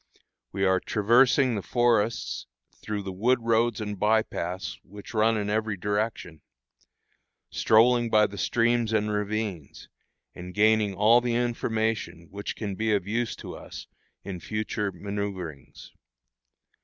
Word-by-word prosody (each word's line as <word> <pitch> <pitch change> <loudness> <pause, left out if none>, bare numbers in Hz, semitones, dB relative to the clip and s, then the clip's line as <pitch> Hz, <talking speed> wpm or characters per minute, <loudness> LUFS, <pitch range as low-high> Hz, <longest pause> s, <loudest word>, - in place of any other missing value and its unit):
We 95 0 0
are 95 0 +3
traversing 125 +6 +3
the 105 - -2
forests, 120 -1 0 0.3
through 105 -1 -4
the 95 - -5
wood 115 +8 +2
roads 115 -1 +2
and 105 -2 -5
by 110 +1 +3
paths 90 0 -5
which 105 +4 -12
run 110 0 +3
in 105 -1 -2
every 110 0 -1
direction; 105 -5 -3 1.1
strolling 120 +1 +4
by 105 -1 +5
the 100 0 -6
streams 120 -1 +1
and 105 -1 +1
ravines, 105 -6 -4 0.4
and 90 0 -9
gaining 105 -1 +3
all 110 +5 +5
the 120 -1 -1
information 110 -7 -2
which 100 +1 -5
can 105 -3 -4
be 110 +2 +1
of 95 -3 -2
use 115 +2 -1
to - - -9
us - - -9 0.4
in 95 -2 -6
future 105 +1 -3
manoeuvrings. 95 -6 -6
105 Hz, 135 wpm, -26 LUFS, 100-115 Hz, 1.1 s, by